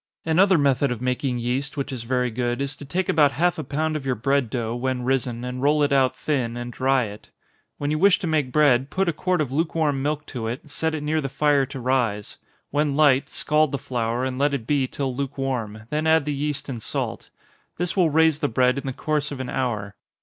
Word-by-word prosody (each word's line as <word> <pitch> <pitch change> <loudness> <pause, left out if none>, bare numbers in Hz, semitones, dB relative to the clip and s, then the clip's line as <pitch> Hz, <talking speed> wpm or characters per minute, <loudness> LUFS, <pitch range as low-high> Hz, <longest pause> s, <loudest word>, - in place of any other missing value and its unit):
Another 185 +3 +4
method 140 -2 +2
of 120 - -3
making 125 0 -1
yeast, 130 +5 -2
which 140 0 -3
is 130 -3 -4
very 125 +1 0
good, 120 +1 -1
is 140 0 -3
to 145 - -10
take 180 +6 -1
about 145 -3 +4
half 175 +2 +1
a - - -3
pound 155 +3 -1
of 150 - -3
your 130 -2 0
bread 135 +1 +1
dough, 115 -1 -2
when 125 0 -2
risen, 125 -2 -1
and 125 0 -5
roll 150 +2 +3
it 145 0 +2
out 130 -2 +3
thin, 125 -6 -2
and 120 0 -6
dry 130 +1 +2
it. 105 -1 -9 0.5
When 145 0 -2
you 155 - 0
wish 195 +1 +5
to 200 - -5
make 155 -6 0
bread, 135 -2 +3
put 190 0 0
a 170 - +1
quart 180 +2 0
of 135 -4 -2
lukewarm 155 -2 0
milk 150 +1 -2
to 115 -4 -5
it, 135 +6 -6
set 160 +1 -1
it 150 - -4
near 155 +1 0
the 135 - -3
fire 140 0 +2
to 140 -1 -7
rise 120 -5 -1 0.3
when 145 -1 +1
light, 140 -3 +4
scald 155 -1 +2
the 140 - -1
flour, 120 -1 -2
and 130 0 -3
let 140 0 +2
it 120 -5 -5
be 140 0 +1
till 130 -1 -3
lukewarm 130 -6 -3
then 155 +1 0
add 160 -2 +4
the 150 - -1
yeast 145 0 -3
and 125 -5 -5
salt. - - -4 0.5
This 175 0 -1
will 180 -4 +4
raise 160 0 +3
the 145 - +1
bread 125 +2 +2
in 135 - -7
the 135 - -2
course 150 +1 -1
of 140 - -6
an 130 -1 -4
hour. 105 -6 -2
140 Hz, 235 wpm, -24 LUFS, 125-150 Hz, 0.5 s, wish